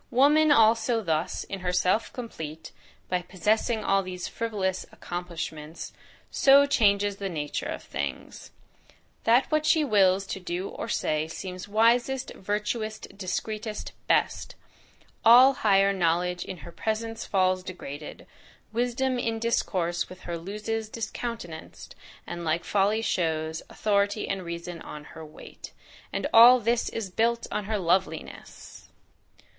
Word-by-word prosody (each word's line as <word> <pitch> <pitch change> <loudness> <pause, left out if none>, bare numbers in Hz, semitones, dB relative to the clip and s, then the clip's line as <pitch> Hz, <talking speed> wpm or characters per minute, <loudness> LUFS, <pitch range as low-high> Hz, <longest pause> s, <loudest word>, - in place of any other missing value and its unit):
Woman, 290 +4 +5
also, 230 -2 +4
thus 165 0 -1
"in 195 - -6
herself 180 +4 +1
complete," 160 -10 -7 0.4
by 180 -1 0
possessing 215 +5 0
all 195 0 +3
these 180 -1 -5
FRIVOLOUS 195 -5 -2
accomplishments, 170 -3 -6 0.4
so 280 +1 +6
changes 205 -7 +2
the 195 -1 -3
nature 150 -4 -3
of - - -5
things, - - -6 0.8
"That 235 +3 +5
what 310 0 +2
she 315 0 +3
wills 195 -5 +3
to 195 - -5
do 180 +1 -4
or - - -6
say 155 0 0
Seems 180 +3 -7
wisest, 240 +5 +2
virtuousest, 210 +2 -3
discreetest, 210 +3 -4 0.2
best; - - +1 0.7
All 250 +4 +8
higher 200 -7 +3
knowledge 180 0 0
in 185 - -6
HER 170 - -9
PRESENCE 225 +4 -3
falls 185 -1 +2
Degraded. 155 -5 -8 0.5
Wisdom 245 +2 0
in 225 -1 -1
discourse 185 -7 -1
with 185 0 -12
her 170 - -5
Loses 210 +5 -4
discountenanc'd, 225 -6 -6 0.3
and 175 0 -6
like 170 +1 0
folly 205 +3 +1
shows; 160 -4 -1
Authority 205 0 0
and 195 -1 -2
reason 170 0 -6
on 150 - -9
her 160 - -9
wait." 155 -1 -12 0.4
And - - -2
all 240 +2 +9
this 235 +1 0
is 210 -5 -5
built 230 +4 +1
on 210 - -2
her 215 +1 -1
loveliness! 170 -3 -3
200 Hz, 130 wpm, -27 LUFS, 175-230 Hz, 0.8 s, all